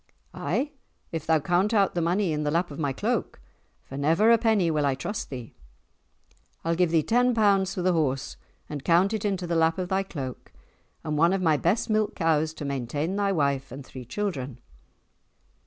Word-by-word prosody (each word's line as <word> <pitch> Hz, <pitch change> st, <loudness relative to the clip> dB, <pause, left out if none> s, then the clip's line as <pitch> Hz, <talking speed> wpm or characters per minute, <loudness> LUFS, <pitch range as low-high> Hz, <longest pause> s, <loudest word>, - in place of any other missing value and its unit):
"Ay, 290 Hz, +2 st, -1 dB, 0.4 s
if 160 Hz, -2 st, -4 dB
thou 160 Hz, -1 st, +4 dB
count 180 Hz, +8 st, +1 dB
out 200 Hz, -2 st, +3 dB
the 175 Hz, -, -1 dB
money 175 Hz, +2 st, +1 dB
in 150 Hz, -, -1 dB
the 150 Hz, -, 0 dB
lap 170 Hz, +2 st, 0 dB
of 140 Hz, -, -8 dB
my 145 Hz, -3 st, 0 dB
cloak, -, -, -2 dB, 0.4 s
for 135 Hz, -, -9 dB
never 165 Hz, +10 st, +4 dB
a 230 Hz, -, +7 dB
penny 215 Hz, -7 st, +2 dB
will 150 Hz, -1 st, +1 dB
I 140 Hz, -2 st, +2 dB
trust 205 Hz, +10 st, -4 dB
thee." 125 Hz, -4 st, -8 dB, 1.1 s
"I'll 165 Hz, -, +2 dB
give 175 Hz, 0 st, +2 dB
thee 160 Hz, -1 st, +2 dB
ten 245 Hz, +4 st, +2 dB
pounds 195 Hz, -3 st, +3 dB
for 180 Hz, -, -2 dB
the 185 Hz, 0 st, +3 dB
horse 140 Hz, -5 st, -1 dB, 0.3 s
and 145 Hz, -2 st, -6 dB
count 180 Hz, +6 st, +3 dB
it 215 Hz, -1 st, -2 dB
into 190 Hz, -3 st, -1 dB
the 170 Hz, 0 st, -1 dB
lap 165 Hz, 0 st, +3 dB
of 180 Hz, -1 st, -3 dB
thy 190 Hz, 0 st, +1 dB
cloak, 135 Hz, -10 st, -7 dB, 0.5 s
and 155 Hz, -2 st, -2 dB
one 170 Hz, +3 st, +4 dB
of 195 Hz, -, 0 dB
my 160 Hz, -3 st, +4 dB
best 175 Hz, +9 st, +1 dB
milk 215 Hz, -1 st, +1 dB
cows 160 Hz, -2 st, +1 dB
to 150 Hz, -, -6 dB
maintain 140 Hz, +6 st, -2 dB
thy 200 Hz, -1 st, +1 dB
wife 140 Hz, -6 st, 0 dB
and 135 Hz, +1 st, -8 dB
three 130 Hz, -1 st, -9 dB
children." 140 Hz, -, -4 dB
165 Hz, 200 wpm, -26 LUFS, 145-195 Hz, 1.1 s, a